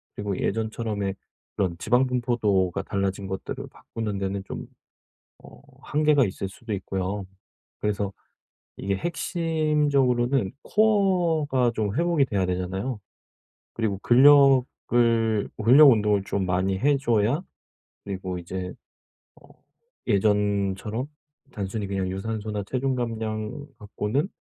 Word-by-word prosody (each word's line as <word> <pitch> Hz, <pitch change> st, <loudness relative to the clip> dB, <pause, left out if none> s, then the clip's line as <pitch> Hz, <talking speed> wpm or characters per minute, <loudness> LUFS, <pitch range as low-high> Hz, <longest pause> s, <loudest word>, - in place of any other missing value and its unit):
그리고 100 Hz, -2 st, -3 dB
예전처럼의 110 Hz, -3 st, -2 dB, 0.4 s
그런 90 Hz, -4 st, -1 dB
지방 125 Hz, +8 st, +2 dB
분포도가 110 Hz, -7 st, 0 dB
달라진 100 Hz, 0 st, -2 dB
것들을 95 Hz, 0 st, -5 dB
바꾸는 110 Hz, -3 st, -5 dB
데는 95 Hz, 0 st, -3 dB
좀 -, -, -6 dB, 0.8 s
어 -, -, -15 dB, 0.2 s
한계가 150 Hz, -2 st, +3 dB
있을 95 Hz, -1 st, -4 dB
수도 110 Hz, +3 st, -7 dB
있고요. 95 Hz, +1 st, -3 dB, 0.6 s
그래서 100 Hz, -1 st, -1 dB, 0.7 s
이게 100 Hz, 0 st, -2 dB
핵심적으로는 145 Hz, -, +1 dB
코어가 175 Hz, -, +2 dB
좀 105 Hz, -2 st, -1 dB
회복이 170 Hz, -3 st, +3 dB
돼야 100 Hz, -7 st, -1 dB
되잖아요. 95 Hz, +6 st, -3 dB, 0.8 s
그리고 110 Hz, -4 st, -1 dB
근력을 120 Hz, -5 st, +4 dB, 0.2 s
근력 140 Hz, +5 st, +9 dB
운동을 105 Hz, -4 st, +2 dB
좀 100 Hz, -2 st, -2 dB
많이 95 Hz, +1 st, 0 dB
해줘야 135 Hz, -, +2 dB, 0.6 s
그리고 95 Hz, -2 st, -4 dB
이제 90 Hz, +1 st, -5 dB, 0.7 s
어 -, -, -19 dB, 0.6 s
예전처럼 105 Hz, +2 st, +1 dB, 0.4 s
단순히 100 Hz, 0 st, -4 dB
그냥 95 Hz, -1 st, -2 dB
유산소나 105 Hz, +1 st, -3 dB
체중 130 Hz, +1 st, 0 dB
감량 115 Hz, +2 st, -3 dB
갖고는 105 Hz, -, -2 dB
110 Hz, 260 characters per minute, -25 LUFS, 100-130 Hz, 0.8 s, 근력